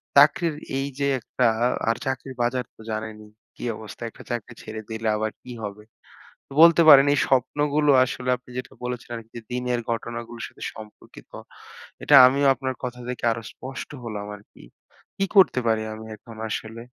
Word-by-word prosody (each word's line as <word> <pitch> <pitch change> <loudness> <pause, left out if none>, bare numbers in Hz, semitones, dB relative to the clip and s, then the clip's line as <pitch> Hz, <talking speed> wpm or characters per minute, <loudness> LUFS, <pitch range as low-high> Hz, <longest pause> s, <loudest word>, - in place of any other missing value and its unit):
চাকরির 150 +3 +5 0.2
এই 135 +1 -1
যে 140 - +1
একটা 125 +1 -1 0.4
আর 115 - +2
চাকরির 130 0 -4
বাজার 125 +1 0
তো - - -16
জানেনই 110 -1 -6 0.3
কি - - -10
অবস্থা? 110 0 -11
একটা - - -14
চাকরি 120 0 -4
ছেড়ে 110 0 -6
দিলে 110 0 -3
আবার 110 0 -1
কি 125 - -10
হবে? 105 0 -6 0.7
তো - - -13
বলতে 170 0 +8
পারেন 140 -2 +10
এই - - +1
স্বপ্নগুলো 145 +3 +2
আসলে 125 0 -3
আপনি 125 0 -20
যেটা 125 - -6
বলেছেন 125 -1 -5
আরকি 115 -1 -11
যে 120 - -7
দিনের 125 -1 -1
ঘটনাগুলোর 115 0 -5
সাথে - - -16
সম্পর্কিত। 110 -1 -13 0.7
এটা - - +4
আমিও 140 +2 +2
আপনার 130 -1 -3
কথা 125 0 -5
থেকে 125 -1 -5
আরো 115 0 -5
স্পষ্ট 130 +1 -8
হলাম 105 -3 -5
আরকি। 105 - -18 0.5
কি 195 - +1
করতে 185 -9 +6
পারি 110 -1 +2
আমি 110 0 -9
এখন 115 +1 -14
আসলে? 110 +2 -5
120 Hz, 170 wpm, -24 LUFS, 110-135 Hz, 0.7 s, পারেন